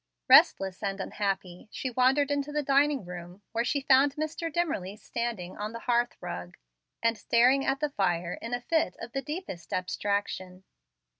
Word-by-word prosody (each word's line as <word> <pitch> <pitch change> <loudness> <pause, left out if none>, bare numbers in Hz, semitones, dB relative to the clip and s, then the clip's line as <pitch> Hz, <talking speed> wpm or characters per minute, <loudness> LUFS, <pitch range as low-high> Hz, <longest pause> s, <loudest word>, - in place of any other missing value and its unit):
Restless 255 - +6
and 195 -1 -2
unhappy, 195 -2 -3
she 260 - -4
wandered 265 +4 +3
into 285 0 -1
the 300 0 -1
dining 280 -3 +2
room, 180 +2 -9
where 230 +1 0
she 280 +3 0
found 275 +1 +4
Mr. 310 +2 -3
Dimmerly 290 - -1
standing 230 -6 -4
on 210 +2 -5
the 230 - -7
hearth 240 0 +1
rug, 90 0 -7 0.5
and 230 0 +3
staring 250 +5 +3
at 270 +2 0
the 300 -1 0
fire 175 -6 0
in 230 - -6
a 245 0 -1
fit 315 - 0
of 235 - -7
the 270 - -2
deepest 295 - -6
abstraction. 185 0 -2
235 Hz, 165 wpm, -28 LUFS, 190-280 Hz, 0.5 s, Restless